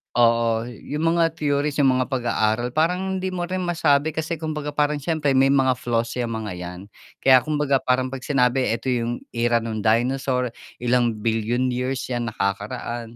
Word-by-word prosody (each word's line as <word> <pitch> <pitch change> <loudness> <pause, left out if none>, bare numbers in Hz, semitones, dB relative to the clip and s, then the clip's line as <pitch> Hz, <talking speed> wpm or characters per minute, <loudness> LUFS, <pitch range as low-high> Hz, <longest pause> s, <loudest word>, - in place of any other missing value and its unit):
Oo, 115 -1 +3
yung 150 +8 -2
mga 165 -1 +3
theories, 145 0 0
yung 135 -2 +4
mga 130 +1 -1
pag-aaral 120 -2 0
parang 180 +4 +1
hindi 185 0 -2
mo 175 -1 -3
rin 185 0 -2
masabi 160 -3 +2
kasi 160 +2 -3
kumbaga 150 -2 -4
parang 150 0 +1
siyempre 150 -1 0
may 135 0 +4
mga 135 -1 +3
flaws 115 -1 -1
'yang 115 -2 -2
mga 110 -3 -4
'yan. 90 0 -7 0.4
Kaya 130 -1 +7
kumbaga 145 0 0
parang 130 0 0
'pag 135 - -5
sinabi 125 -3 +1
eto 130 +2 -3
yung 120 0 -2
era 115 0 +1
nung 110 -1 -3
dinosaur, 125 +3 +1 0.3
ilang 120 -2 +2
bilyon 115 +3 0
years 130 +1 -3
'yan 120 -1 -1
nakakaraan 115 +3 -3
130 Hz, 170 wpm, -23 LUFS, 115-150 Hz, 0.4 s, Kaya